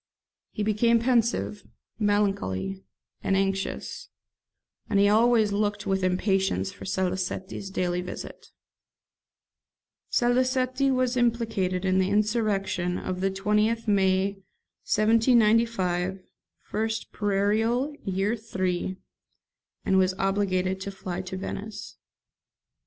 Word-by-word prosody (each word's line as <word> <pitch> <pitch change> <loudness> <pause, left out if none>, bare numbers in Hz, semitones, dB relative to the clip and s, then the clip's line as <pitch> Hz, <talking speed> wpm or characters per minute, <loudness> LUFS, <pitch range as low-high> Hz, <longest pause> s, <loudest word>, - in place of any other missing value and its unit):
He 210 - -4
became 220 +3 +3
pensive, 235 -4 +1 0.4
melancholy, 195 - 0 0.4
and 195 - +1
anxious; 195 0 -2 0.8
and 200 - +2
he 200 - +5
always 220 0 +4
looked 205 0 -1
with 190 -1 0
impatience 190 +1 +1
for - - -11
Salicetti's 190 +1 -2
daily 180 -2 -1
visit. 180 - -8 1.6
[Salicetti 255 +2 +2
was 255 -1 +1
implicated 225 -7 0
in 190 0 +3
the 190 0 +2
insurrection 205 -4 0
of 185 0 -4
the 195 - +2
20th 210 +4 0
May 195 -1 +2 0.5
1795, 215 -5 +3 0.5
1st 220 +1 -2
Prairial, 220 +7 +1
Year 195 +2 0
III., 185 -4 -2 0.9
and 190 - +3
was 185 0 +2
obliged 190 -1 0
to 200 - -4
fly 185 -2 -5
to 185 0 -6
Venice. 200 +2 -6
200 Hz, 100 wpm, -26 LUFS, 190-225 Hz, 1.6 s, he